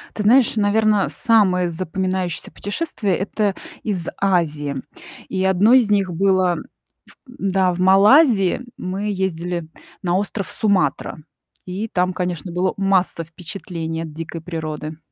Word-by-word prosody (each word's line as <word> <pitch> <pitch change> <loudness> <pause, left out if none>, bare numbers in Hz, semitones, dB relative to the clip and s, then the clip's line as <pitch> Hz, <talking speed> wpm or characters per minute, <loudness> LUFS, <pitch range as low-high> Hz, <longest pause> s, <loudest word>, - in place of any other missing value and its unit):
Ты 210 - -2
знаешь, 240 +2 +4
наверно, 210 -1 +2
самое 185 -6 +2
запоминающееся 185 +1 -3
путешествие- 205 - -2
это 200 0 -1 0.3
из 185 -6 -3
Азии. 155 -7 +1 0.5
И 190 -1 -2
одно 190 +5 +4
из 245 -5 +5
них 195 -3 +2
было 185 0 +2
в - - -6 0.7
м 250 - -13
да, 190 -2 +1
в 175 - -6
Малайзии 200 - +5 0.2
мы 195 +3 -3
ездили 175 -3 -2 0.4
на 175 -1 +1
остров 200 0 -3
Суматра. 200 -4 0 0.5
И 190 +5 -4
там, 180 -3 0
конечно, 180 -2 -3
было 180 +2 0
масса 190 -3 +1
впечатлений 165 -1 -6
от 160 -2 -8
дикой 165 +1 -6
природы. 155 -2 -5
185 Hz, 130 wpm, -21 LUFS, 175-205 Hz, 0.7 s, из